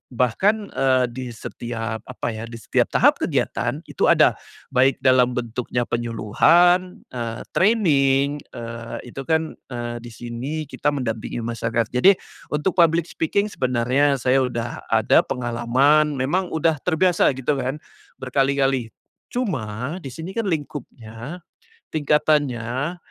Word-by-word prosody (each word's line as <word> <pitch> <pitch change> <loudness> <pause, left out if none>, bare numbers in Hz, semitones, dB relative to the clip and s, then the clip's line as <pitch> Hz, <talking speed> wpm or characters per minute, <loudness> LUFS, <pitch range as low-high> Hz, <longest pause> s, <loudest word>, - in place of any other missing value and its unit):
bahkan, 200 - +1
eee, 130 -1 +2
di 130 +1 -6
setiap 115 0 -5
apa, 125 -2 -4
ya, 110 +1 -6
di 115 - -9
setiap 115 - 0
tahap - - +3
kegiatan - - -1
itu - - -1
ada, - - +4 0.3
baik 130 +2 +4
dalam 125 -1 +4
bentuknya 120 0 -2
penyuluhan, 160 - +2
eee, 115 -2 -4
training 145 -9 +3 0.2
eee, 115 +1 -7
itu - - -8
kan, 160 -1 +1 0.2
eee, 120 -2 -5
di 120 - -11
sini 120 +7 -5
kita 145 0 -4
mendampingi 115 -2 -3
masyarakat. 115 -1 -2
Jadi 185 +11 +5 0.3
untuk 175 +5 -1
public 165 0 +5
speaking 200 +6 0
sebenarnya 130 +3 +1
saya 130 +1 +2
udah 120 -2 -3
ada - - +4
pengalaman, 130 +5 +2
memang 175 +8 0
udah 160 -2 0
terbiasa 180 +2 +2
gitu 135 +2 -1
kan 130 +3 -2 0.4
berkali-kali, 135 -1 +1 0.4
cuma 135 - -3
di 135 - -6
sini 170 - -8
kan 230 - 0
lingkupnya, 145 - -5 0.5
tingkatannya, 145 -1 +1
130 Hz, 125 wpm, -22 LUFS, 120-155 Hz, 0.5 s, Jadi